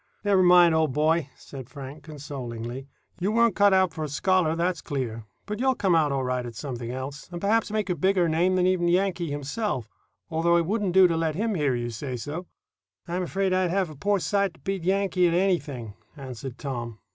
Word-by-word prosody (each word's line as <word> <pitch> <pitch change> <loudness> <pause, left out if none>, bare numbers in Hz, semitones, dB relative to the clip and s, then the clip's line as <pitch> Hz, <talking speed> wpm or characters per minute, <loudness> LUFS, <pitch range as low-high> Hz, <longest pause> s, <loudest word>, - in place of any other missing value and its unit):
"Never 200 -2 +4
mind, 175 -2 +6
old 160 -4 +2
boy," 155 0 +1
said 130 -3 -10
Frank, 140 +1 -9
consolingly. 135 -4 -7 0.3
"You 190 +4 0
weren't 230 -2 +3
cut 205 0 +5
out 190 -2 +3
for 160 -1 -4
a 150 - -3
scholar, 175 +1 +2
that's 170 -1 -1
clear; 115 -6 -4 0.2
but 210 0 -5
you'll 260 +1 +2
come 190 -5 +1
out 155 -3 +3
all 135 -1 0
right 125 0 -1
at 120 -1 -8
something 120 -2 -5
else, 130 +3 -6
and 175 - -5
perhaps 215 +4 +1
make 215 -1 -1
a 180 - +1
bigger 185 +2 +2
name 170 +4 +2
than 180 -1 +2
even 180 -2 +2
'Yankee' 180 -1 +1
himself, 145 - -3 0.4
although 170 +2 +3
it 170 - +1
wouldn't 200 -1 -1
do 190 0 +7
to 165 - 0
let 160 -2 0
him 220 +4 0
hear 145 -8 +1
you 120 0 -3
say 125 +2 -5
so." 155 +9 -6 0.6
"I'm 180 +1 -2
'fraid 195 0 0
I'd 185 -1 +2
have 185 -2 0
a - - -11
poor 205 +8 +1
sight 200 -1 0
to - - -21
beat 195 -3 -3
Yankee 190 -1 +2
at 170 - +1
anything," 145 - -1 0.2
answered 130 -2 -7
Tom. 120 -5 -5
165 Hz, 210 wpm, -26 LUFS, 140-190 Hz, 0.6 s, do